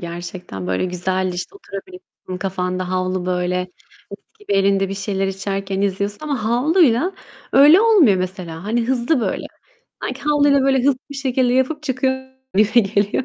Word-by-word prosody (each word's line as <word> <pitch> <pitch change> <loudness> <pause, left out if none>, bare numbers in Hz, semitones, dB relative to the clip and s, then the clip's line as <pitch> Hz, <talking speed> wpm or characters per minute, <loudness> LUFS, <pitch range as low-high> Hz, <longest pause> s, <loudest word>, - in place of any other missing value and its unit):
gerçekten. 175 - -7
Böyle, 95 - 0
güzel, 185 +1 -1
işte, 180 - -5
oturabil 365 - -9 0.4
kafanda 185 -1 -2
havlu, 185 0 -1
böyle, 180 0 0 0.5
mis - - -12
gibi 415 - -5
elinde 195 0 +2
bir 195 - -4
şeyler 195 -1 -2
içerken 195 0 -3
izliyorsun 200 +1 -1
ama 285 -7 -3
havluyla 275 - +3 0.4
öyle 295 +7 +7
olmuyor 400 - +5
mesela. 180 -2 -5
Hani, 230 +2 0
hızlı, 255 +2 +1
böyle, - - -2 0.6
sanki 260 +2 -5
havluyla, 290 -1 +3
böyle, 270 0 +3
hızlı 260 0 +2
bir - - -7
şekilde 260 -2 +1
yapıp 260 +4 0
çıkıyor 260 -1 -2 0.3
gibime 215 +1 +4
geliyor. 205 +4 0
205 Hz, 150 wpm, -20 LUFS, 185-265 Hz, 0.6 s, öyle